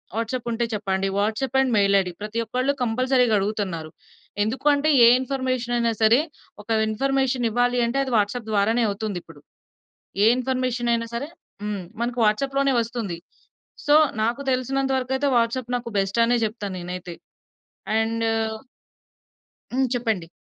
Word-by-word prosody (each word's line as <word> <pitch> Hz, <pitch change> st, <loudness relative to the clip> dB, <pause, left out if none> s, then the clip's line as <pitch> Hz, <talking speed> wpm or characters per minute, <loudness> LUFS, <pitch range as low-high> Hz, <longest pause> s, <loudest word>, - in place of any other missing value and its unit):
WhatsApp 230 Hz, +2 st, -3 dB
ఉంటే 235 Hz, +1 st, 0 dB
చెప్పండి. 195 Hz, -2 st, -1 dB
WhatsApp 220 Hz, +6 st, -1 dB
and 265 Hz, -2 st, +2 dB
mail 200 Hz, -1 st, +4 dB
ID." 180 Hz, -1 st, -2 dB
ప్రతి 215 Hz, +2 st, -3 dB
ఒక్కళ్ళు 255 Hz, +4 st, 0 dB
కంపల్సరీగా 250 Hz, 0 st, +2 dB
అడుగుతున్నారు. 195 Hz, -6 st, -3 dB, 0.5 s
ఎందుకు 230 Hz, +7 st, -4 dB
అంటే 290 Hz, +2 st, +1 dB, 0.2 s
ఏ -, -, +8 dB
ఇన్ఫర్మేషన్ 255 Hz, -2 st, -2 dB
అయినా 235 Hz, -1 st, +1 dB
సరే, 220 Hz, +3 st, +6 dB, 0.4 s
ఒక -, -, -32 dB, 0.2 s
ఇన్ఫర్మేషన్ 265 Hz, +1 st, 0 dB
ఇవ్వాలి 245 Hz, +2 st, +1 dB
అంటే 240 Hz, +4 st, -1 dB
అది 260 Hz, -2 st, -4 dB
వాట్సాప్ 215 Hz, +3 st, -1 dB
ద్వారానే 220 Hz, +4 st, +2 dB
అవుతుందిప్పుడు. 195 Hz, -7 st, -5 dB, 0.8 s
ఏ -, -, +6 dB
ఇన్ఫర్మేషన్ 255 Hz, -2 st, -1 dB
అయినా 230 Hz, 0 st, -1 dB
సరే 275 Hz, +5 st, -3 dB, 0.4 s
హ్మ్, 205 Hz, -2 st, -3 dB, 0.2 s
మనకు 240 Hz, 0 st, -2 dB
వాట్సాప్‌లోనే 275 Hz, +6 st, +1 dB
వస్తుంది. 225 Hz, -7 st, -4 dB, 0.7 s
సో 290 Hz, -, +4 dB, 0.3 s
నాకు 235 Hz, +5 st, -1 dB
తెలిసినంత 270 Hz, +1 st, 0 dB
వరకయితే 265 Hz, +2 st, -1 dB
వాట్సాప్ 235 Hz, +1 st, 0 dB
నాకు 240 Hz, -1 st, -7 dB
బెస్ట్ 195 Hz, +3 st, -1 dB
అనే 240 Hz, +1 st, +2 dB
చెప్తాను 210 Hz, -3 st, -5 dB
నేనైతే. 180 Hz, 0 st, -6 dB, 0.9 s
అండ్ 225 Hz, 0 st, -1 dB, 1.5 s
హ్మ్. 260 Hz, +1 st, +2 dB
చెప్పండి 225 Hz, -8 st, -1 dB
235 Hz, 135 wpm, -23 LUFS, 210-255 Hz, 1.5 s, ఏ